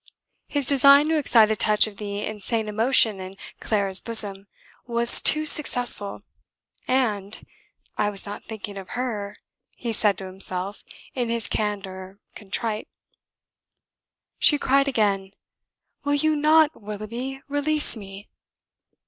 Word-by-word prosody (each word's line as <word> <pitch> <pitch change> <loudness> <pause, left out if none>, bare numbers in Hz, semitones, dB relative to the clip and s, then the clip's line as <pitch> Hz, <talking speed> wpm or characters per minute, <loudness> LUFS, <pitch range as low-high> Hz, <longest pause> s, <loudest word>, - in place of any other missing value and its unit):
His 285 -2 -2
design 280 +3 +5
to 320 - +2
excite 225 -6 +4
a - - +1
touch 210 -1 +2
of 210 -2 -9
the 205 0 -5
insane 215 +1 -3
emotion 220 -1 +3
in 190 +1 -9 0.2
Clara's 195 -3 0
bosom 205 -4 -1 0.4
was 235 0 +4
too 310 0 +5
successful, 245 -9 +2 0.6
and, 215 -6 -1 0.5
"I 205 - +2
was 200 -2 -2
not 205 0 -8
thinking 205 -2 -8
of 190 -1 -9
her," 210 -5 -4 0.4
he 235 -2 -4
said 205 -3 +1
to 190 - -8
himself 185 +1 -5 0.3
in 245 -3 -2
his 230 -1 -2
candour, 195 -2 -4 0.2
contrite. 215 +2 -4 1.5
She 295 - +5
cried 275 0 +2
again: 200 -6 0 0.7
"Will 285 0 0
you 310 +2 +2
not, 310 0 +3
Willoughby 230 +6 -7
release 290 +1 0
me?" 200 -1 -11
215 Hz, 125 wpm, -23 LUFS, 200-265 Hz, 1.5 s, design